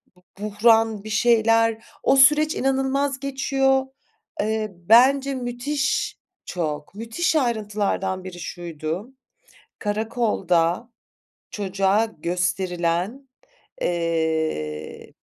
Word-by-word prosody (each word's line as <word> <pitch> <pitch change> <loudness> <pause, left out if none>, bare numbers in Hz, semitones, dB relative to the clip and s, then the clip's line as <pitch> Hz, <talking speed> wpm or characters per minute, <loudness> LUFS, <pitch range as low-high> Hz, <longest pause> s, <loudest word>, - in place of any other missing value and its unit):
bu 180 - -26 0.2
buhran, 220 0 +3
bir 215 - -8
şeyler, 225 0 +3 0.2
o 270 - +4
süreç 300 +3 +5
inanılmaz 270 +1 0
geçiyor. 270 -1 +1 0.6
Eee, 215 0 -1
bence 260 +9 +4
müthiş 255 +4 -2 0.3
Çok. 150 -1 -4
Müthiş 230 +10 -1
ayrıntılardan 210 -7 -1
biri 185 -1 -8
şuydu, 170 - -5 0.7
karakolda 205 -4 0 0.6
çocuğa 195 +1 +1
gösterilen 180 - -1 0.5
eee 160 - -2
215 Hz, 80 wpm, -23 LUFS, 180-260 Hz, 0.7 s, süreç